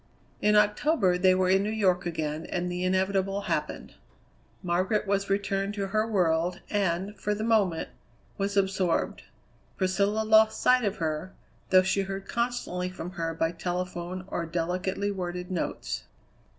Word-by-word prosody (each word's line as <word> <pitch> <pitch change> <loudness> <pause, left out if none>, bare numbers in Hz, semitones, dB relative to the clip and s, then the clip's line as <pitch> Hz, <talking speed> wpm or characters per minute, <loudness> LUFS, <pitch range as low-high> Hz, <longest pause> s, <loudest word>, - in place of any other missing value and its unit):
In 210 0 +4
October 210 - +3
they 185 +1 +4
were 185 0 +2
in 190 +1 +4
New 205 - -1
York 185 -5 +1
again, 155 -1 -3
and 180 0 -2
the 180 0 -3
inevitable 190 +1 +1
happened. - - -3 0.7
Margaret 185 +5 +1
was 200 0 0
returned 195 0 0
to 195 -2 -2
her 215 +2 +1
world, 175 -3 +1
and, 195 0 0
for 210 0 -1
the 215 - -3
moment, 205 -7 +2 0.5
was 200 0 -2
absorbed. 190 -3 +1 0.6
Priscilla 200 +3 +1
lost 220 0 +5
sight 250 0 +4
of 205 0 0
her, 160 +3 -3 0.3
though 185 0 +6
she 190 +1 +1
heard 195 0 -5
constantly 235 -7 -2
from 180 -1 -7
her 165 -2 -3
by 165 0 0
telephone 180 +1 -4
or 170 -3 -3
delicately 180 +4 -1
worded 180 -1 -4
notes. 180 - -3
190 Hz, 150 wpm, -28 LUFS, 180-205 Hz, 0.7 s, though